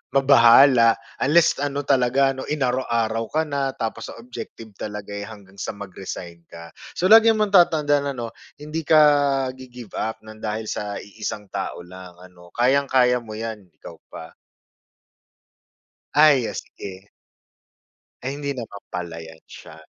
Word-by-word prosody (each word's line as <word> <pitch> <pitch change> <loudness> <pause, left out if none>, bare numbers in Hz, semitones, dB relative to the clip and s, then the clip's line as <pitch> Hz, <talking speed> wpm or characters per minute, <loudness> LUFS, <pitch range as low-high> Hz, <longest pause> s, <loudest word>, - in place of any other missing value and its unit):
mabahala 125 -2 +6 0.3
unless 165 +2 +3
ano 145 0 -2
talaga 135 0 +2
ano 130 0 -7
inaraw-araw 120 -5 -1
ka 155 +7 0
na 140 -3 -3
tapos 110 -1 -4
sa - - -9
objective 115 -1 -10
talaga, 105 -1 -6
eh, 100 0 -6
hanggang 100 -2 -14
sa - - -5
mag-resign 95 -3 -8
ka. 85 0 -11 0.2
So, 185 +3 +1
lagi 225 +1 +8
mong 215 -2 0
tatandaan 145 -5 +3
ano 115 -1 -5 0.3
hindi 150 +2 -5
ka 155 - +6 0.5
gi-give 125 -4 -12
up 110 - -3
ng 110 0 -12
dahil 110 0 -4
sa 105 -1 -4
iisang 105 -1 -7
tao - - -5
lang 90 0 -12
ano. 90 -1 -17
Kayang-kaya 125 0 +3
mo 110 -2 -9
yan, 110 -3 -6
ikaw - - -14
pa. 80 0 -10 1.8
Ay, 145 -3 +5
yes, - - -4 0.2
sige. 95 +1 -9 1.1
Ay, 130 +2 -3
hindi 145 0 -5
naman 110 -4 -8
pala 85 -2 -6
yan 80 0 -12
siya. 80 - -13
115 Hz, 140 wpm, -22 LUFS, 100-140 Hz, 1.8 s, lagi